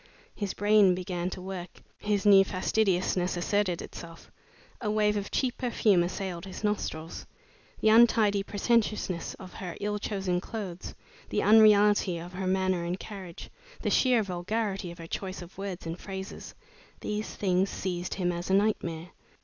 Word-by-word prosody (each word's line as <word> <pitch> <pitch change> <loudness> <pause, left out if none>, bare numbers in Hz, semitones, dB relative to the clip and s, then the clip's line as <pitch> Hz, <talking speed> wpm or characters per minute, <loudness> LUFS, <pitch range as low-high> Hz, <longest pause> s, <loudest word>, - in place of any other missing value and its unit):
His 200 -3 -3
brain 205 -2 +5
began 180 -1 -3
to 185 - -7
work, 185 -2 -7 0.2
his 205 -1 -1
new 195 -1 +8
fastidiousness 185 -2 0
asserted 180 0 0
itself. 165 -1 -11 0.5
A 210 - -1
wave 210 0 +2
of 205 -1 -3
cheap 255 -3 -1
perfume 220 -7 +3
assailed 185 0 -3
his 190 +2 -8
nostrils. 170 -6 -3 0.5
The 220 - +4
untidy 220 -3 +5
pretentiousness 205 -4 0
of 185 -1 -11
her 180 -3 -7
ill 210 0 -2
chosen 195 -4 -1
clothes, 190 -5 -6 0.3
the - - 0
unreality 210 -4 +5
of 175 +2 -8
her 185 0 -3
manner 185 -2 +1
and 175 +2 -3
carriage, 190 -5 -9 0.3
the - - 0
sheer 250 -4 +4
vulgarity 195 +1 -2
of 170 - -10
her 165 - -9
choice 185 +2 -5
of 175 +2 -14
words 195 -3 -5
and 165 +1 -5
phrases 190 +1 -7 0.5
these 210 +1 -4
things 190 0 +1
seized 180 -1 -3
him 180 -2 0
as 175 +1 -5
a 190 - +4
nightmare. 180 -5 0
190 Hz, 155 wpm, -28 LUFS, 180-210 Hz, 0.5 s, new